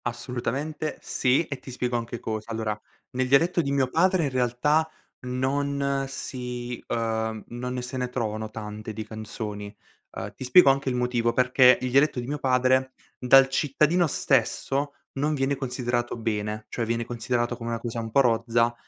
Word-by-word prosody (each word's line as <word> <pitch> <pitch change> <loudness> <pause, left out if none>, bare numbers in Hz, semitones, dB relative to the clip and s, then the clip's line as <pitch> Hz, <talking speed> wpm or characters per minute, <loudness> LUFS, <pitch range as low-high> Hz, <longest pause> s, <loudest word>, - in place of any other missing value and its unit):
Assolutamente 125 +6 -3
sì, 130 +6 +1
e 140 -3 -6
ti 130 - -12
spiego 125 -1 -2
anche 120 0 -3
cosa: 110 0 -4
allora, 110 -2 -2 0.3
nel 130 0 -1
dialetto 165 +6 +4
di 140 -3 -2
mio 140 -2 +2
padre 180 +5 +2
in 145 - +1
realtà 130 +6 +1 0.4
non 140 +2 0
si 125 -2 -5
ehm, 110 -2 -2
non 125 +1 -4
ne 125 - -3
se 125 +1 -5
ne 125 -1 -2
trovano 110 -3 -3
tante 110 0 -7
di 110 0 -5
canzoni. 105 -1 -6 0.4
Ehm, - - -5
ti - - -8
spiego 135 +3 +7
anche 135 0 -1
il 125 - -1
motivo, 120 -1 +1
perché 125 0 +5
il 125 -1 -2
dialetto 140 0 +3
di 120 - -4
mio 145 +3 -3
padre, 130 0 +2 0.3
dal 135 +2 +7
cittadino 150 +5 +2
stesso 140 +1 0 0.2
non 150 +3 0
viene 135 0 0
considerato 125 -2 -2
bene, 105 -1 -3
cioè 120 - -2
viene 115 +1 -1
considerato 120 +1 -1
come 115 -1 -6
una 115 0 -2
cosa 115 0 -4
un 115 0 -4
po' 140 +5 +4
rozza 115 -1 +2
125 Hz, 170 wpm, -26 LUFS, 115-135 Hz, 0.4 s, spiego